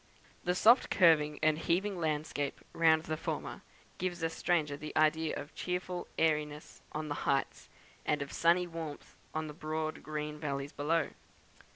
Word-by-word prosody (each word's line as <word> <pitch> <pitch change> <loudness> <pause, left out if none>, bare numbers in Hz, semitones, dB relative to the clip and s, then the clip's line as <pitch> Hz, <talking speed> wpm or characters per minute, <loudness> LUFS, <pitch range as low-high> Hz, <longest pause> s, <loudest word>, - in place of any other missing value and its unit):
The 180 0 +1
soft 235 +7 +6
curving 155 -5 +5
and 155 0 +3
heaving 185 +3 0
landscape 150 -3 -2
round 160 -1 +4
the 155 -1 -2
former - - -4 0.4
gives 175 -2 -2
a 165 - +1
stranger 160 -5 +1
the 150 +1 -6
idea 155 0 +3
of 145 +1 -7
cheerful 180 0 -3
airiness 150 -1 0
on 155 0 -3
the 145 - -1 0.2
heights, 135 -1 0 0.3
and 150 -1 +1
of 140 - -10
sunny 175 +2 +4
warmth 165 -4 -7 0.2
in 155 0 -1
the 150 - -7
broad 155 0 -3
green 150 0 -4
valleys 140 -1 -3
below. 155 +1 +1
155 Hz, 155 wpm, -32 LUFS, 150-170 Hz, 0.4 s, soft